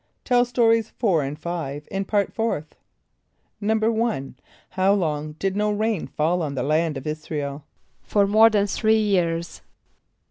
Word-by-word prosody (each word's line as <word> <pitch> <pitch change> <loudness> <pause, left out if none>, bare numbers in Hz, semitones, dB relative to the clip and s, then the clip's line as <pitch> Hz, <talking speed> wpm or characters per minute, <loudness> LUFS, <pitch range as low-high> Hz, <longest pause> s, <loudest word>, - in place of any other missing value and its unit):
(Tell 245 -1 +3
Stories 230 -2 +2
4 190 -10 +2
and 140 +2 -4
5 150 -3 -5
in 195 0 -2
Part 205 0 0
Fourth.) 190 -10 -2 0.9
=1.= 220 - 0
For 130 - -37 0.3
how 190 +1 +2
long 155 -5 -2
did 190 +5 -2
no 210 +1 +1
rain 215 -2 -1
fall 170 +4 0
on 145 -3 -3
the - - -1
land 155 +1 +1
of 135 - -8
[)I][s+]´ra 155 0 -4
el? 140 0 -6 0.4
=For 205 -1 +2
more 215 +3 +6
than 205 -2 +2
three 220 +2 +2
years. 175 -5 0
190 Hz, 155 wpm, -23 LUFS, 155-220 Hz, 0.9 s, more